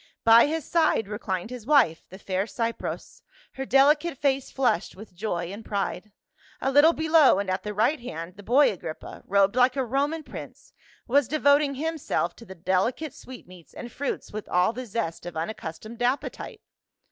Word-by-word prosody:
By 230 +3 +7
his 320 +1 -3
side 320 -10 +2
reclined 205 -1 -4
his 245 -2 -8
wife, 255 - +3
the 190 - -11
fair 190 0 -2
Cypros, 230 0 -4 0.3
her 270 0 -6
delicate 295 +3 +3
face 275 -1 0
flushed 250 -8 0
with 205 0 -12
joy 175 -3 -3
and 215 +3 -9
pride; 200 0 -3 0.5
a 270 - 0
little 295 +4 +6
below 315 - +4
and 200 -1 -2
at 185 - -1
the 210 - -5
right 230 +9 +1
hand 170 -6 -7
the 205 - -12
boy 255 +8 +4
Agrippa, 160 -4 -8
robed 200 +1 +3
like 250 +1 +4
a 265 -2 0
Roman 285 +6 -1
prince, - - -11 0.3
was 275 0 +3
devoting 285 -1 +3
himself 295 - -2
to 230 - -13
the 190 - -11
deli 185 +6 +1
cate 315 +3 -7
sweetmeats 185 -9 -13
and 240 - -8
fruits 280 -1 -4
with 215 0 -6
all 180 +5 +2
the 250 +1 -7
zest 190 -6 -4
of 175 - -7
unac 165 +7 -3
customed 215 +9 -8
appetite. 250 +3 -2
235 Hz, 180 wpm, -26 LUFS, 190-275 Hz, 0.5 s, By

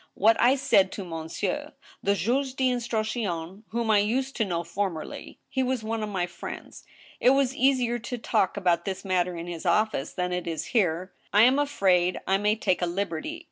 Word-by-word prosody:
what 225 +3 +5
I 250 +3 +5
said 195 -8 +3
to 195 - -5
monsieur, 175 - -4 0.3
they*^^ 240 +8 0
d' - - -3
instruction, 215 -6 -2
whom 230 -1 0
I 210 - +5
used 260 +6 0
to 225 - +2
know 170 -3 -2
former 170 -1 -2
ly; - - -9
he 265 - -1
was 255 -3 -1
one 225 0 -2
of 215 - -3
my 185 -3 -1
friends. 175 0 -9 0.4
It - - +5
was 270 -1 +1
easier 255 -3 +2
to 240 +2 -5
talk 200 -4 0
about 175 -3 +1
this 190 0 -4
matter 180 -2 0
in 165 - -5
his 170 -2 -6
office,... 190 -3 +1
than 180 -1 -2
it 180 -1 -3
is 165 -1 -3
here. 185 -4 +1 0.2
I 210 +2 +6
am 260 +4 +5
afraid 185 -11 +2
I 195 +1 +2
may 210 +1 +2
take 185 -5 0
a 175 - +1
liberty 195 - -3
200 Hz, 195 wpm, -26 LUFS, 180-240 Hz, 0.4 s, I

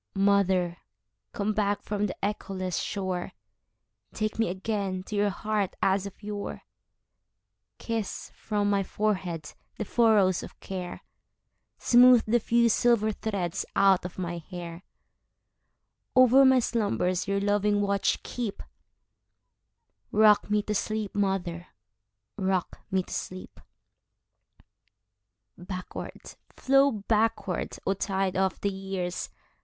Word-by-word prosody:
Mother, 190 -3 +2 0.5
come 210 +1 -1
back 205 -1 0
from 210 0 -1
the 185 - -5
echoless 190 -3 -3
shore, 190 -3 -3 0.8
Take 215 0 -2
me 225 - +2
again 190 -1 -2
to 210 - -6
your 205 0 +2
heart 210 -1 -2
as 195 +1 +1
of 200 - -13
yore; 205 -1 -5 1.1
Kiss 225 -3 -4
from 205 -2 -1
my 200 -1 +2
forehead 185 -6 -2 0.2
the 215 - -3
furrows 210 -5 +3
of - - -11
care, 180 -2 -6 0.7
Smooth 245 -1 +6
the 235 +2 +3
few 235 +1 +3
silver 230 -1 +3
threads 200 -5 -3
out 195 -2 +4
of 180 - -7
my 175 -2 -3
hair; 170 0 -8 1.3
Over 255 +1 +7
my 260 0 +6
slumbers 205 -7 0
your 200 0 +1
loving 205 0 +2
watch 200 -1 0
keep;—Rock 215 -1 -2
me 210 0 +2
to 210 - -2
sleep, 215 0 -2
mother,—rock 175 - -4
me 190 -2 +1
to - - -9
sleep! 185 0 -6 2.0
Backward, 185 +1 -7 0.3
flow 275 +1 +4
backward, 215 -2 -1
O 195 - +2
tide 195 -1 -1
of 190 0 0
the 200 - 0
years! 190 -2 -4
200 Hz, 110 wpm, -27 LUFS, 185-215 Hz, 2.0 s, Over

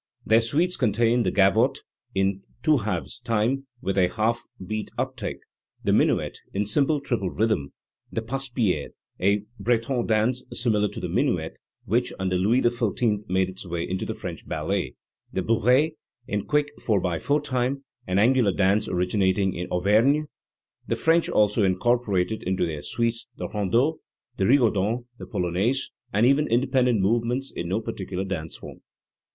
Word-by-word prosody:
Their 110 +2 +5
suites 160 +10 +1
contain 115 0 +2
the - - +1
gavotte, 95 -1 +3 0.3
in 95 0 +1 0.2
2 155 -2 +4
/2 110 +2 -3
time, 120 +4 0
with 95 0 0
a 90 - +5
half 115 +3 0 0.2
beat 110 +2 -3
up - - -2
take; - - -4 0.5
the - - +2
minuet, - - +2 0.2
in 105 +1 +1
simple 145 +8 +2
triple 120 -9 -2
rhythm; 110 -11 0 0.4
the 115 - -2
passepied, 120 - -1 0.3
a 100 +2 +2 0.2
Breton 120 +3 0
dance 115 +3 +2
similar 105 -4 +1
to - - -7
the - - -3
minuet, - - -1 0.3
which, 120 +5 +1
under 95 -1 -1
Louis 105 +8 +3
XIV,, 115 -3 0
made 95 0 +2
its 95 0 -7
way 85 -1 -3
into 95 +1 -2
the - - -4
French - - -7
ballet; - - -2 0.4
the 95 - -2
bounce, 125 - +3 0.4
in 105 -2 -2
quick 150 -1 +1
*/4 110 - 0
time, 130 0 -1 0.2
an 90 0 0
angular 115 -1 +4
dance 100 +3 +2
originating 95 +1 +1
in 90 +1 -4
Auvergne, 110 +11 +3 0.6
The - - 0
French 165 +1 +2
also 105 +1 +3
incorporated 100 +1 +1
into 95 0 0
their 80 -3 -4
suites 115 +6 -2
the - - -4
rondeau, 115 - +1 0.4
the 95 - +1
rigau 125 0 +4
don, 110 +5 -1
the - - -8
polonaise, 95 +10 0 0.2
and 105 +4 +3
even 140 +4 +4
independent 125 -2 +2
movements 120 +6 0
in 85 - -3
no 95 +5 0
particular 95 -4 -4
dance 80 -5 -4
form. - - -11
110 Hz, 155 wpm, -25 LUFS, 95-125 Hz, 0.6 s, Their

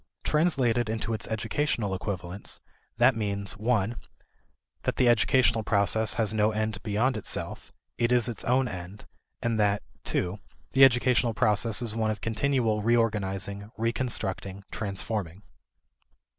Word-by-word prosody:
Translated 130 -8 +1
into 110 0 -2
its 110 - -3
educational 110 -1 -1
equivalents, 95 -1 -5 0.4
that 130 - +5
means 100 -2 -1
(i) 115 -2 +1 0.9
that - - -1
the 125 - +3
educational 120 -1 +3
process 110 +1 +3
has 110 -3 0
no 105 0 +2
end 110 -2 -2
beyond 115 +4 0
itself; 105 - -3 0.3
it 120 +1 +1
is 120 -1 +3
its 115 -4 -4
own 130 +1 +2
end; 90 0 -8 0.4
and 115 -2 0
that 105 -1 +1 0.3
(ii) 90 +3 -1 0.3
the 135 0 +5
educational 125 -2 +4
process 105 +3 +2
is 115 -3 +1
one 110 -1 0
of 105 -1 -2
continual 115 -1 0
reorganizing, 105 -3 0
reconstructing, 100 -5 -1
transforming. 100 -2 -3
110 Hz, 130 wpm, -27 LUFS, 100-120 Hz, 0.9 s, that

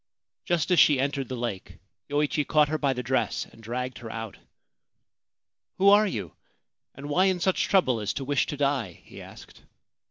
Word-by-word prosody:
Just 175 0 0
as 180 - +5
she 145 -2 +5
entered 135 -1 -1
the 130 - -3
lake 115 -6 -5 0.3
Yoichi 150 +1 0
caught 150 0 +3
her 155 0 -1
by 140 -2 +1
the 125 0 -5
dress - - -1
and 115 - -18
dragged 125 +3 -5
her 115 -2 -8
out. 115 -2 -6 0.7
' - - -62
Who 195 +1 +5
are 210 +1 +6
you, 100 - -5 0.6
and 140 +2 -8
why 175 +6 +2
in 190 -2 +1
such 190 +1 +1
trouble 130 - +2
as 105 -1 -2
to 135 - -4
wish 140 0 +1
to 145 - -5
die? 135 - -1
' - - -31
he - - -12
asked. - - -14
140 Hz, 195 wpm, -26 LUFS, 120-155 Hz, 0.7 s, are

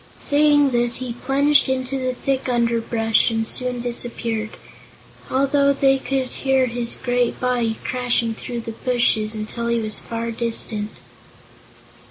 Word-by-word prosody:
Saying 290 -1 +3
this, 240 -1 +3
he 250 -2 -3
plunged 280 +3 +3
into 260 +1 -1
the 255 -1 -2
thick 270 0 -1
underbrush 230 -2 +2
and 225 -1 -1
soon 250 0 -2
disappeared, 235 -2 -4 0.7
although 280 +1 +3
they 270 -1 +3
could 265 -1 -1
hear 265 0 +1
his 240 -1 -3
great 245 -1 0
body 240 -3 0
crashing 245 -2 0
through 240 +1 -5
the 230 - -6
bushes 225 -2 0
until 220 +2 -4
he 235 0 +1
was 215 -2 -2
far 230 0 -4
distant. 225 -2 -2
245 Hz, 135 wpm, -21 LUFS, 230-265 Hz, 0.7 s, Saying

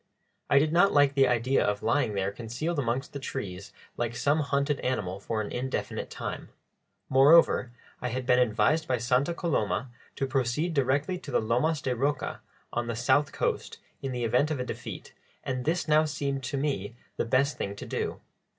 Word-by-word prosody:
I 140 - +5
did 150 +2 +3
not 180 +4 +5
like 145 -1 +4
the 135 -1 +4
idea 125 +2 +2
of 105 0 -1
lying 115 -2 +1
there 95 0 0
concealed 120 +10 -3
amongst 130 +1 -2
the 140 - -4
trees 100 -8 -6 0.3
like 120 0 -2
some 145 +5 +2
hunted 140 0 0
animal 100 -7 -2
for 110 +2 -2
an 100 - -7
indefinite 130 +2 -3
time; - - -6 0.6
moreover, 135 -2 +5 0.3
I 125 - -1
had 125 +1 -3
been 125 0 +4
advised 125 +6 +2
by 125 - +1
Santa 125 +7 +1
Coloma 130 - -1 0.2
to 135 - -1
proceed 135 +5 0
directly 140 +6 +1
to - - -10
the - - +2
Lomas 125 +8 +1
de 125 -2 0
Rocha, 140 +2 -1 0.3
on 120 0 -1
the 115 - -2
south 130 +5 +2
coast, - - -2 0.2
in 135 - -3
the 125 -1 -3
event 125 +6 +2
of 155 -4 -2
a 125 - -2
defeat, - - -7 0.3
and 130 -1 -3
this 170 +3 0
now 155 0 +4
seemed 140 -3 -2
to 140 - -2
me 130 -7 -2 0.2
the - - 0
best 130 +3 +1
thing 100 0 -3
to - - -8
do. - - -3
130 Hz, 185 wpm, -28 LUFS, 120-145 Hz, 0.6 s, I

